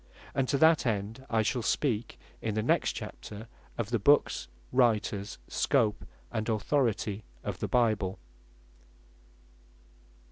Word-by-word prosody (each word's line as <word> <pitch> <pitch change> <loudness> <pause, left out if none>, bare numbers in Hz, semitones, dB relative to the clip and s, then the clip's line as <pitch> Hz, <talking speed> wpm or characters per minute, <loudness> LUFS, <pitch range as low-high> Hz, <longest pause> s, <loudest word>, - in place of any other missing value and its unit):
And 135 -2 +1
to 140 - +2
that 160 -2 +5
end, 110 +4 -2
I 110 -1 +2
shall 125 +3 0
speak 115 -1 0 0.2
in 110 -2 -2
the 110 - 0
next - - +2
Chapter, 105 +2 -8 0.3
or 115 - 0
the 115 +2 -1
Books, 120 - +3 0.2
Writers, 110 -5 +1
Scope 105 -1 +1 0.3
and 110 -1 -2
Authority 110 -2 0 0.2
of - - -4
the - - -1
Bible. 110 -6 +1
110 Hz, 120 wpm, -30 LUFS, 105-125 Hz, 0.3 s, that